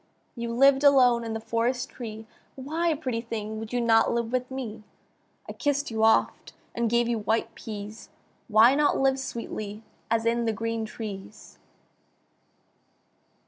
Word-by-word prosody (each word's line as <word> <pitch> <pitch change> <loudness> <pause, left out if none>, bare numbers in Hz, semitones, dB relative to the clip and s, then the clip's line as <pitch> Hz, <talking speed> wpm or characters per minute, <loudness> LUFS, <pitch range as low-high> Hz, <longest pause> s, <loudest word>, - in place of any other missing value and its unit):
You 235 -1 -4
lived 270 +3 +4
alone 250 -4 +5
in 225 -1 -4
the 225 - -3
forest 235 +3 -1
tree, 220 -2 -8 0.3
Why, 315 +5 -1
pretty 255 -6 -3
thing! 220 -2 -5
would 225 0 -7
you 245 - 0
not 225 -1 +4
live 235 -1 -1
with 255 0 -1
me? 255 -5 -6 0.7
I - - -6
kiss'd 285 -2 -1
you 220 0 -1
oft 225 - +2 0.2
and 235 -1 0
gave 235 +1 +2
you 235 -1 0
white 220 +2 -1
peas; 210 0 -8 0.4
Why 225 +3 +6
not 290 +1 +2
live 270 0 +2
sweetly, 215 -4 -6 0.3
as 225 0 +1
in 235 0 +1
the 225 - +1
green 230 +1 -3
trees? 210 -1 -9
230 Hz, 150 wpm, -26 LUFS, 220-255 Hz, 0.7 s, Why